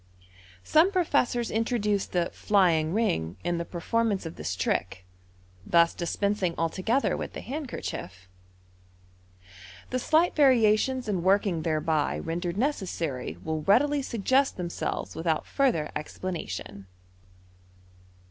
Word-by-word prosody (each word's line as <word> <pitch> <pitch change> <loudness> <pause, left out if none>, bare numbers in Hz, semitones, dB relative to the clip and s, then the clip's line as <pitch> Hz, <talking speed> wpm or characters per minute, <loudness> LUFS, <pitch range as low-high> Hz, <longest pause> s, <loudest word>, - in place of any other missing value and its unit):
Some 320 - +4
professors 285 - +1
introduce 215 -3 0
the 175 -2 -1
" - - -28
flying 170 -6 +3
ring 90 - 0
" - - -26
in 175 0 -1
the 170 - -3
performance 205 +3 -1
of 165 - -6
this 85 +5 -4
trick, 95 -1 -2 0.6
thus 170 - +4
dispensing 185 0 -1
altogether 185 +11 0
with - - -5
the - - -6
handkerchief. 235 - -6 1.6
The 255 - 0
slight 320 +7 +2
variations 255 -2 +3
in 195 -4 -1
working 190 -2 +2
thereby 155 -1 0
rendered 170 +2 -3
necessary 170 - -2
will 160 -1 -2
readily 280 - +3
tuggest 260 +3 +1
themselves 175 -2 -4
without 160 -1 -1
further 245 - +1
explanation. 155 - -5
185 Hz, 115 wpm, -27 LUFS, 160-240 Hz, 1.6 s, Some